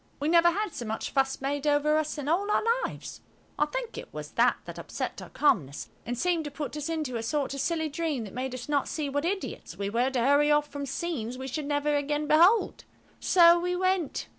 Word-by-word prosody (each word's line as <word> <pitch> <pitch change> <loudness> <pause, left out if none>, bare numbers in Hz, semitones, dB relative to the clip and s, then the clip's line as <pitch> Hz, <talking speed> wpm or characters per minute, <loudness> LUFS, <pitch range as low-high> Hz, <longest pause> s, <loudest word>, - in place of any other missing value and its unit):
We 295 - 0
never 340 0 +6
had 405 +2 -2
so 245 - -5
much 220 -1 -4
fuss 270 -1 0
made 285 +2 -2
over 295 +1 +3
us 310 0 -3
in 290 -1 -5
all 375 +7 +1
our - - +2 0.2
lives. - - -8 0.4
I - - +3
think - - -5
it - - -10
was - - -7
that - - +3
that - - -8
upset - - -5
our - - -9
calmness, 150 - +1 0.2
and 245 0 -2
seemed 345 +2 +1
to - - -3
put 290 +1 -5
us 300 +1 -4
into 305 -7 -2
a - - -3
sort 275 +4 -1
of 275 - -5
silly 320 +3 0
dream 305 -4 -2
that 205 - -9
made 255 +1 -3
us 245 - -7
not 290 -2 +1
see 300 -3 -3
what 285 +3 -1
idiots 385 +2 -4
we 200 0 -3
were 240 +4 +2
to 265 -2 -1
hurry 285 +4 +4
off 295 0 +3
from 285 -1 -6
scenes 265 -5 -3
we 260 - -6
should 285 +2 -4
never 290 0 +1
again 295 +1 -1
behold. 345 +9 +4 0.4
So 345 -1 +6
we 360 +1 -1
went. 370 -4 0
295 Hz, 230 wpm, -28 LUFS, 270-335 Hz, 0.4 s, never